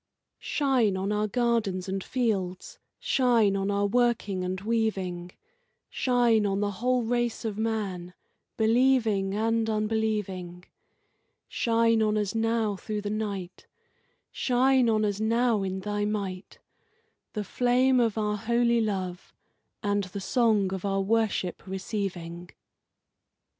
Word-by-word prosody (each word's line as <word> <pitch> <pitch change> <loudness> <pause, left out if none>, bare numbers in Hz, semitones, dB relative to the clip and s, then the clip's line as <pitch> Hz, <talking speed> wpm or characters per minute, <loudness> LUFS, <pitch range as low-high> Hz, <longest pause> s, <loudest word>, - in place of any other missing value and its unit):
Shine 255 -9 +1
on 195 +2 -2
our 210 0 0
gardens 225 -5 0
and 190 0 -3
fields, 195 -8 -2 0.2
shine 235 -6 +2
on 195 0 -1
our 200 0 +1
working 215 -4 +1
and 185 +1 -3
waving; 195 -5 -1 0.6
Shine 240 -4 +2
on 195 -1 0
the 205 0 0
whole 250 0 +2
race 240 0 -1
of 215 -1 -3
man, 195 -6 -3 0.4
believing 225 -4 +2
and 225 +1 +1
unbelieving; 210 -5 -2 0.8
Shine 230 -1 +2
on 215 0 +2
us 205 -2 -1
now 225 -2 0
through 210 +2 -4
the 205 0 -4
night, 200 -4 -4 0.6
Shine 255 -1 +2
on 215 -1 +2
us 205 -1 -1
now 230 0 +2
in 190 0 -3
Thy 205 +1 -2
might, 200 -3 -4 0.8
The 210 - -2
flame 250 +4 +2
of 230 -3 +1
our 210 -1 0
holy 235 +2 +2
love 185 -4 -4 0.5
and 205 -1 0
the 185 +2 -7
song 210 -2 +2
of 190 - -5
our 195 -1 0
worship 210 -3 0
receiving. 185 -3 -4
210 Hz, 125 wpm, -27 LUFS, 195-230 Hz, 0.8 s, shine